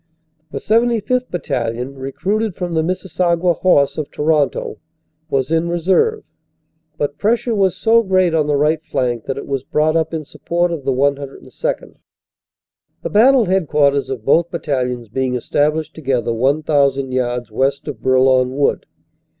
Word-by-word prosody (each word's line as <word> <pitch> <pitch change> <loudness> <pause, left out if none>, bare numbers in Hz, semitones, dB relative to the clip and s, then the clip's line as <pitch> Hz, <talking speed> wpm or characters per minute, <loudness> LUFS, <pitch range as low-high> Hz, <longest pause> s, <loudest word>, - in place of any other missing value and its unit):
The - - -6
75th. 235 +2 +1
Battalion, 125 -6 -3
recruited 185 +10 -2
from 175 -2 -4
the 160 - +2
Missisauga 175 0 0
Horse, 145 -6 +3
of 150 - -4
Toronto, 150 -2 0 0.5
was 135 0 -1
in 165 +1 +1
reserve, 190 - +1 0.7
but 145 -1 -3
pressure 235 +2 +1
was 195 -4 +1
so 230 +1 +4
great 185 -4 +2
on 155 -2 +1
the 145 - +1
right 150 +2 +1
flank 120 -6 -2
that 135 - -3
it - - -6
was 135 -2 -3
brought 155 +3 +1
up 160 -1 0
in 160 -2 -4
support 175 +4 -2
of 155 -5 -5
the 135 - +1
102nd., 140 - -3 1.1
the - - -2
battle 245 +3 +5
headquarters 150 -7 +1
of 120 -5 -5
both 165 +4 +3
battalions 125 -8 -3
being 130 +3 -2
established 150 +5 0
together 130 -6 -1
1,000 140 +1 +1
yards 120 -2 -2
west 135 +6 -1
of 135 -7 -6
Bourlon 130 0 +3
Wood. 145 - 0
150 Hz, 145 wpm, -18 LUFS, 135-180 Hz, 1.1 s, battle